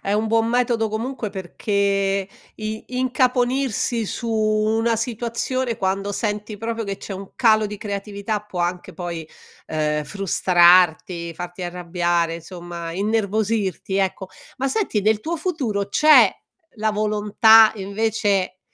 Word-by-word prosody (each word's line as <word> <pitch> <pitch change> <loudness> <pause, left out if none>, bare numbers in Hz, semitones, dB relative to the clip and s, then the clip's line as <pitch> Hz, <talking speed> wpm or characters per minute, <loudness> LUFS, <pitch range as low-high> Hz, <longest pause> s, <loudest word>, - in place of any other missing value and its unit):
È 200 - -2
un 215 +1 0
buon 225 0 +2
metodo 235 -1 +1
comunque 230 +1 -4
perché 195 0 -1 0.3
i 215 0 -5
incaponirsi 250 -2 +1
su 230 +3 -4
una 220 +1 +1
situazione 235 +2 -2
quando 195 +1 -1
senti 210 -1 -3
proprio 225 +1 -3
che 195 -1 -4
c'è 195 - -8
un 195 0 -9
calo 220 -3 +4
di 210 0 -6
creatività 200 +1 -4
può 200 -4 -6
anche 175 +1 -3
poi, 170 -4 -6 0.4
ehm, 150 -1 -1
frustrarti, 175 -2 +3
farti 175 +2 -7
arrabbiare, 175 -1 -1
insomma, 170 0 -8
innervosirti, 205 -1 -1
ecco. 190 -1 -1 0.3
Ma 270 +1 0
senti, 385 - 0
nel 215 +1 +2
tuo 335 +6 -3
futuro 260 - -2
c'è 305 +9 +6 0.4
la 215 0 0
volontà 215 +1 +5
invece, 200 -2 -1
210 Hz, 125 wpm, -22 LUFS, 190-225 Hz, 0.4 s, c'è